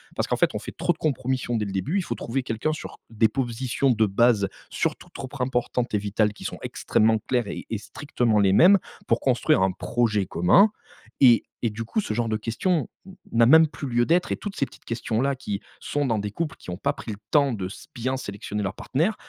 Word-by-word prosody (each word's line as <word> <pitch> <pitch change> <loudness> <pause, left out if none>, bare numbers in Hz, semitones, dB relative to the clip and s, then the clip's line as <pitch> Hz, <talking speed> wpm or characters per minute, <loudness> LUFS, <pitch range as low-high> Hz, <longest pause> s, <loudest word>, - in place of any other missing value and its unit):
Parce - - -1
qu'en - - +1
fait - - +3
on - - -2
fait - - -9
trop 175 - +1
de 160 - -24
compromissions 130 -4 -1
dès 105 - -1
le 100 - -5
début 125 - -1
il 195 - 0
faut - - -3
trouver 130 +3 -3
quelqu'un 125 +6 -1
sur - - -8
des 110 0 +3
positions 130 +2 -1
de 110 -2 +3
base 105 0 +3 0.2
surtout - - -2
trop 135 - -7
importantes 125 -2 -1
et - - +4
vitales 105 +1 0
qui - - -12
sont - - -5
extrêmement 110 +1 +1
claires 120 -4 +1
et - - -6
et 110 - -1
strictement 120 -3 -1
les 100 -2 +4
mêmes 185 - +7 0.3
pour - - +2
construire 95 - +3
un 95 - +2
projet 105 0 0
commun 175 - +5 0.5
et 120 -4 +6 0.2
et 115 - +1
du 110 +2 -5
coup 165 - -2
ce 110 - -3
genre 115 +1 -1
de 110 - 0
questions 135 - -1 0.2
n 190 - -12 0.2
n'a 115 0 +5
même 160 +4 +7
plus 145 -1 -7
lieu 120 -1 +2
d'être 175 +5 +2
et - - 0
toutes 205 -1 -6
ces 140 - 0
petites - - -19
questions-là 120 +3 -1
qui 105 -6 -4 0.2
sont 145 0 -1
dans 115 -4 +1
des 105 0 -4
couples 160 +8 -3
qui - - -12
ont 90 - -4
pas - - 0
pris 110 - -7
le 100 - -6
temps 140 -3 +4
de 95 -4 -3
s 95 - -11
bien 130 +3 -1
sélectionner 105 -2 -5
leurs 95 - -2
partenaires, 170 +11 0
120 Hz, 235 wpm, -25 LUFS, 105-140 Hz, 0.5 s, mêmes